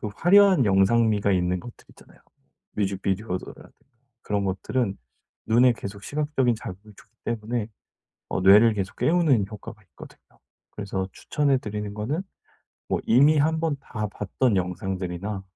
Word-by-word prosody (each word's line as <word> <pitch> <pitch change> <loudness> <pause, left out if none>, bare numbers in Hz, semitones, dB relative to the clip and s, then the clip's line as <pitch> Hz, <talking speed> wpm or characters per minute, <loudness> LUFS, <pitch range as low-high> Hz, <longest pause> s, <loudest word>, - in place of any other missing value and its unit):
그 105 - -4
화려한 190 -4 +5
영상미가 100 +1 +3
있는 90 0 0
것들 120 +6 -12
있잖아요. - - -20 0.6
뮤직비디오라든가 95 -1 -3 0.5
그런 100 -1 -1
것들은 100 +3 -2 0.5
눈에 120 +2 +5
계속 100 -2 -8
시각적인 145 -4 0
자극을 105 0 -10
주기 - - -19
때문에 115 0 -3 0.6
어 - - -2
뇌를 105 +4 +6
계속 95 -1 -4
깨우는 155 - +2
효과가 105 -3 -10
있거든요. - - -14 0.5
그래서 95 -2 -4
추천해 140 -3 0
드리는 105 -2 -5
거는 135 - -3 0.7
뭐 - - 0
이미 145 +6 +5
1 160 +2 +2
번 160 -3 -1
다 105 -5 -5
봤던 105 +3 -1
영상들이나 95 +2 -3
105 Hz, 320 characters per minute, -24 LUFS, 95-130 Hz, 0.7 s, 뇌를